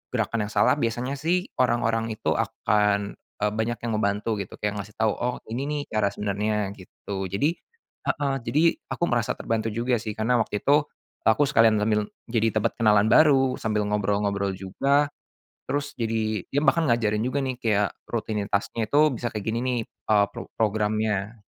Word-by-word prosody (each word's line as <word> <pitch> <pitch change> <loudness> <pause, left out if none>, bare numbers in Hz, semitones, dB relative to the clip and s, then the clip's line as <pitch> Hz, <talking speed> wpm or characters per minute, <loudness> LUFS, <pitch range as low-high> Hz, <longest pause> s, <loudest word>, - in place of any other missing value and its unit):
gerakan 110 -3 0
yang - - -9
salah 150 - +4
biasanya 125 +3 -2
sih 175 +5 +1 0.2
orang-orang 115 -2 +2
itu 110 - -2
akan, 105 -2 0 0.2
eee, 105 - +2
banyak 110 +2 -1
yang 115 - -1
ngebantu 105 +1 0
gitu 100 - -6
kayak 105 0 -1
ngasih 100 +1 -8
tahu 110 -1 +2
oh 125 +3 -2
ini 120 - -2
nih 150 -1 -1
cara 110 -2 +2
sebenarnya 105 0 -1
gitu 95 +1 -6
jadi, 100 - +1 0.6
heeh, 140 -2 0
jadi 150 +3 +2 0.3
aku - - -3
merasa 120 +1 +1
terbantu 115 0 -2
juga 120 +1 0
sih 110 0 -5
karena 120 +3 +2
waktu 105 -2 -1
itu, 145 +1 +4 0.4
aku 110 +6 +5
sekalian 115 -6 +5
sambil 105 -1 +1 0.2
jadi 115 -2 +2 0.2
dapat - - +1
kenalan 105 -1 +4
baru 135 -4 +5
sambil 105 -1 0
ngobrol-ngobrol 100 -1 0
juga, 135 +10 +1 0.6
terus 145 0 -2
jadi 110 -3 -1
dia 140 - +1
bahkan 165 +1 +3
ngajarin 110 -2 +1
juga 130 +3 -1
nih 130 -1 -2
kayak 105 -3 +2 0.2
rutinitasnya 110 0 -1
itu 145 - +3 0.2
bisa 120 +2 -2
kayak 105 -2 -5
gini 115 - -1
nih, 125 -1 0 0.3
eee, 105 -1 +5
pro - - -8
programnya. 110 0 0
110 Hz, 165 wpm, -25 LUFS, 105-125 Hz, 0.6 s, aku